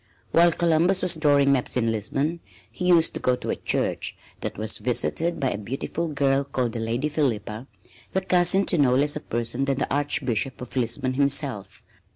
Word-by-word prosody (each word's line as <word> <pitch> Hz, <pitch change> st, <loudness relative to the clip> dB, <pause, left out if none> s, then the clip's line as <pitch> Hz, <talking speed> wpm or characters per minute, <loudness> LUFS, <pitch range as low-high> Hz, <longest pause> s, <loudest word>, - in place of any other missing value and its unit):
While 170 Hz, +1 st, +5 dB
Columbus 170 Hz, +3 st, +2 dB
was 180 Hz, -, +5 dB
drawing 145 Hz, -3 st, +3 dB
maps 130 Hz, -2 st, 0 dB
in 115 Hz, -2 st, +1 dB
Lisbon, 135 Hz, -, -2 dB, 0.3 s
he 180 Hz, +10 st, -4 dB
used 170 Hz, -2 st, +4 dB
to -, -, -4 dB
go 125 Hz, -, +1 dB
to -, -, -5 dB
a -, -, -1 dB
church -, -, -2 dB, 0.2 s
that -, -, -5 dB
was 110 Hz, +1 st, -2 dB
visited 160 Hz, +7 st, 0 dB
by 135 Hz, -3 st, 0 dB
a 100 Hz, -, -4 dB
beautiful 135 Hz, +9 st, -4 dB
girl 140 Hz, -2 st, +1 dB
called 130 Hz, -4 st, -2 dB
the 115 Hz, -, -5 dB
Lady 115 Hz, +6 st, -1 dB
Philippa, 120 Hz, -6 st, -2 dB, 0.4 s
the 190 Hz, -, 0 dB
cousin 185 Hz, +1 st, +3 dB
to 175 Hz, -, +1 dB
no 130 Hz, -3 st, +4 dB
less 145 Hz, +2 st, +1 dB
a -, -, -3 dB
person 120 Hz, 0 st, -2 dB
than 135 Hz, -1 st, -1 dB
the 140 Hz, -, -2 dB
Archbishop 135 Hz, -3 st, -1 dB
of 125 Hz, +1 st, -8 dB
Lisbon 125 Hz, +1 st, -1 dB
himself. 135 Hz, -7 st, +1 dB
135 Hz, 190 wpm, -24 LUFS, 120-160 Hz, 0.4 s, While